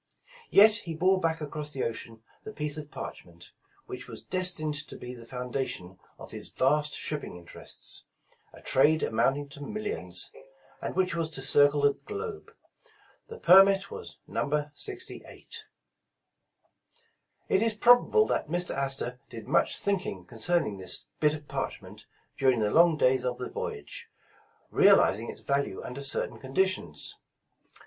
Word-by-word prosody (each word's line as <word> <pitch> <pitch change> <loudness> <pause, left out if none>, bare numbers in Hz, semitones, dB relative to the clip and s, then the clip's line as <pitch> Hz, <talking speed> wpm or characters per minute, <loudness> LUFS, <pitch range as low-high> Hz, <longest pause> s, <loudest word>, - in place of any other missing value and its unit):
Yet 215 +2 +7
he 170 -7 -6
bore 185 +3 +3
back 160 -2 -1
across 150 0 -3
the 135 - -2
ocean 115 -1 -5 0.2
the 215 - -7
piece 150 -6 -4
of 150 -1 -7
parchment, 85 -9 -9 0.3
which - - -8
was - - -9
destined 180 -5 +1
to - - -9
be 125 0 -7
the 120 -2 -11
foundation 125 -7 -4 0.2
of - - -10
his - - -5
vast 150 +3 +2
shipping 150 -9 -4
interests, 85 -1 -8 0.5
a - - -15
trade 155 +4 +4
amounting 135 +6 +1
to 145 +1 -9
mil 215 +9 -5
lions, - - 0 0.5
and - - -4
which 185 -2 +1
was 165 -1 -1
to 135 -4 -4
circle 145 +1 +4
the 145 0 +4
globe. 425 - -7 0.8
The 460 0 -9
Permit 195 - +6
was - - -8
No. 150 0 -2
68. 410 - -5 1.8
It 190 - +3
is 225 -1 +3
probable 245 - +5
that - - -1
Mr. 175 +3 -1
Astor 135 -2 -2
did 115 -2 -9
much - - +3
thinking 185 - -2
concerning 115 - -1
this 95 -1 0
bit 150 0 +3
of 150 -1 -11
parchment - - -6 0.3
during 130 -4 +3
the 105 -1 +1
long 165 -1 +5
days 130 -2 +3
of 125 -1 -2
the 125 - -5
voyage, 70 0 -5 0.6
realizing 110 +4 +4
its - - -8
value 140 -8 -1
under 130 +3 -6
certain 135 - 0
condi 135 +8 +2
tions. 85 - -1
150 Hz, 150 wpm, -28 LUFS, 125-185 Hz, 1.8 s, Yet